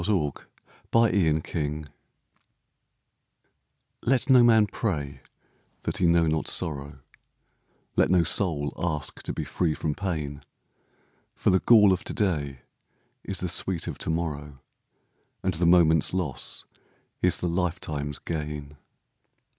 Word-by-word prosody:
LIFE'S 85 -7 -1 0.5
HARMONIES 80 -8 +1 2.2
Let 130 +2 +1
no 125 -1 +8
man 115 -3 +5
pray 75 -10 -3 0.6
that - - -1
he 90 - +2
know 85 0 +4
not 80 0 -1
sorrow, 70 -2 -2 0.9
Let - - +3
no 90 -1 +4
soul 80 -4 +2
ask 75 -4 -2
to - - -3
be - - -4
free 80 -4 -1
from 75 - -2
pain, 75 -6 -4 0.9
For - - +1
the 95 - +4
gall 105 -4 +6
of 95 - -3
to - - -2
day 75 - -1 0.6
is 100 - -3
the 90 - -1
sweet 90 0 0
of - - -6
to - - -3
morrow, 75 -4 -3 0.9
And 95 - 0
the 85 +1 +1
moment's 85 -1 +4
loss 80 -9 -2 0.6
is 90 -1 +4
the 90 - -2
lifetime's 80 -5 -2
gain. 75 -2 -6
85 Hz, 125 wpm, -26 LUFS, 75-95 Hz, 2.2 s, no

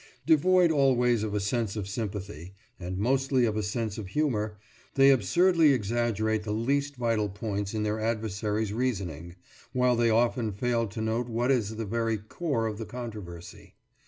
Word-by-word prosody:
Devoid 175 +2 +4
always 125 -5 +3
of 105 -1 -2
a - - +1
sense 105 +1 -1
of 100 -3 -4
sympathy, 100 -4 -5 0.2
and 90 +1 -5
mostly 130 +3 +2
of 110 -2 -1
a 110 - 0
sense 110 +1 -3
of 105 - -6
humour, 110 -5 -1 0.4
they 135 0 +7
absurdly 155 - +4
exaggerate 110 -1 0
the 105 0 -5
least 140 +6 0
vital 115 -4 0
points 100 0 -4
in 105 - -1
their 105 +1 -1
adversaries' 110 -1 -2
reasoning, 90 - -3 0.4
while 125 -1 +3
they 120 0 +2
often 115 -1 +1
fail 115 +2 0
to 105 +2 -6
note 115 +2 -1
what 120 +3 0
is 110 -4 0
the 110 0 -4
very 115 +1 -1
core 115 - -2
of 110 -1 -3
the 110 - -4
controversy. 105 -9 -9
110 Hz, 165 wpm, -28 LUFS, 105-125 Hz, 0.4 s, they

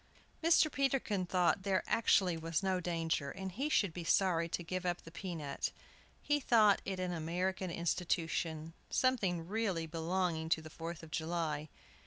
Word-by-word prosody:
Mr. 325 -2 +5
Peterkin 255 -9 0
thought 180 +1 +2
there 190 -1 +1
actually 190 -6 +3
was 165 +2 -2
no 190 -1 +1
danger, 165 -4 -1
and 190 +5 -5
he 265 +11 -2
should 200 - +2
be 175 - -5
sorry 170 -1 +2
to 175 - -2
give 185 +2 -3
up 175 -1 -2
the 165 - -11
pea 180 +1 -5
nut. 145 -3 -3 0.5
He 290 0 +2
thought 220 -6 +5
it 190 -1 -3
an 180 -1 -1
American 180 +3 -2
institution, 165 -2 -1 0.2
something 190 -10 +1
really 195 -5 -1
belonging 165 0 -1
to 160 - +2
the 155 - -10
Fourth 165 +1 -6
of 160 - -11
July. 160 -2 -2
175 Hz, 165 wpm, -34 LUFS, 165-190 Hz, 0.5 s, Mr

